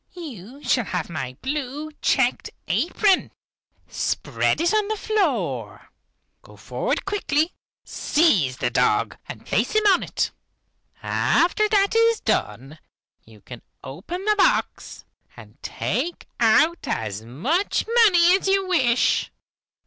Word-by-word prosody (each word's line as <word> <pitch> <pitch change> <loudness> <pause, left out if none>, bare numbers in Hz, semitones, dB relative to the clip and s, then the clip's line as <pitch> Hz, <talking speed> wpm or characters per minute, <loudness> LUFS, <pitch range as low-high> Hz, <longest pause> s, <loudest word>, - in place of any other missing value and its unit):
You 275 - -10
shall 245 -4 +1
have 180 -2 -4
my 130 -5 -5
blue 290 +2 -4
checked - - +1 0.2
apron. 395 -3 +1 0.6
Spread - - -1
it 340 +5 +1
on 425 -1 +1
the 435 - -1
floor. 430 -1 -2 0.5
Go - - -17
forward - - -3
quickly, 355 -5 0 0.3
seize 190 - +1
the 120 -2 -1
dog 120 - +1
and - - -9
place - - 0
him 430 0 +2
on 390 -3 +5
it. - - -2 0.7
After 420 +5 +1
that 400 0 +2
is 460 0 +3
done, 140 +4 -2 0.5
you 110 -2 -18
can 120 +4 -11 0.2
open 320 - -7
the 425 - +4
box, - - 0 0.3
and - - -15
take 345 +1 -3
out 310 +9 +3
as 110 -2 -3
much 185 - -1 0.2
money 355 -4 +5
as 390 - -5
you 390 0 +1
wish. 255 -10 +2
315 Hz, 125 wpm, -23 LUFS, -, 0.7 s, on